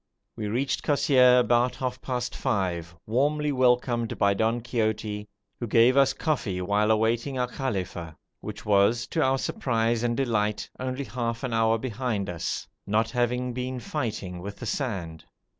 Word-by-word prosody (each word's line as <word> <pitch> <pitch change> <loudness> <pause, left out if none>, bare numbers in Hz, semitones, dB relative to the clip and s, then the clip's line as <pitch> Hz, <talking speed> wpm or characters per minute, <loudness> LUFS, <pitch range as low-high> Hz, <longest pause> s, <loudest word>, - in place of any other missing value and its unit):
We 105 - -4
reached 125 +6 -1
Kosseir 130 -4 +5
about 120 +1 +2
half 125 -1 -3
past 125 -2 -3
five, 90 -8 -1
warmly 145 +6 +1
welcomed 125 -3 +2
by 100 -1 +3
Don 110 +4 +1
Quixote, 110 -3 -2 0.3
who 120 - -3
gave 115 +4 +5
us 135 -1 +5
coffee 125 - -1
while 105 +3 +1
awaiting 115 +5 +1
our 125 0 +1
kafila, 95 - -4 0.2
which - - -8
was, 105 +3 +3
to 160 - 0
our 135 -1 +3
surprise 115 -3 0
and 120 -1 0
delight, 105 -5 0
only 130 +2 -3
half 115 0 -3
an 125 -3 -2
hour 115 0 +3
behind 110 -5 -2
us, 85 -1 -3 0.2
not 110 +2 +1
having 125 0 0
been 125 +1 -3
fighting 110 - -4
with 100 +2 -6
the 120 - -7
sand. 95 - -3
120 Hz, 155 wpm, -26 LUFS, 105-125 Hz, 0.3 s, Kosseir